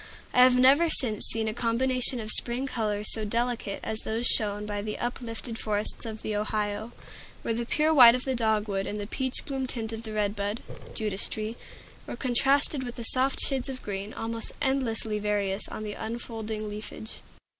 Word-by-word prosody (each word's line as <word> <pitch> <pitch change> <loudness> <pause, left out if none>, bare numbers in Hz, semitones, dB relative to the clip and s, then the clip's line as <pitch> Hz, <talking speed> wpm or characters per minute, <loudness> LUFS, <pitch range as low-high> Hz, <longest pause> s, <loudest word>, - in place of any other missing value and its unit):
I 250 - +6
have 250 0 +7
never 275 +6 +6
since 225 -9 +3
seen 225 -1 +3
a 215 - -1
combination 250 +2 0
of 215 -1 -1
spring 245 +4 +5
colors 215 -5 -1
so 220 - -2
delicate 230 -1 -1
as 220 0 0
those 225 +2 -2
shown 210 -2 +1
by 205 -1 -3
the 210 0 -4
uplifted 235 -1 -4
forests 210 +1 -3
of 220 -1 -7
the 215 - -2
Ohio, 210 +1 -2 0.5
where 230 - -1
the 235 +1 -3
pure 310 +4 +2
white 245 -5 +9
of 255 - -3
the 265 - 0
dogwood 215 -4 +1
and 210 - -4
the 205 - -3
peach 260 +4 -2
bloom 270 -2 -3
tint 225 -3 -4
of 225 - -5
the 220 -1 -6
red 210 -1 0
bud 205 +2 -3 0.3
(Judas 210 -3 -1
tree) 215 +1 -4 0.5
were - - -5
contrasted 270 +3 +2
with 245 -1 -6
soft 260 +3 +3
shades 270 -1 0
of 260 -1 -6
green, 200 +1 -4
almost 225 0 -4
endlessly 240 -6 0
various, 205 -1 -1
on 215 - -6
the 210 -1 -4
unfolding 220 -1 -5
leafage. 215 +1 -8
225 Hz, 185 wpm, -27 LUFS, 210-250 Hz, 0.5 s, white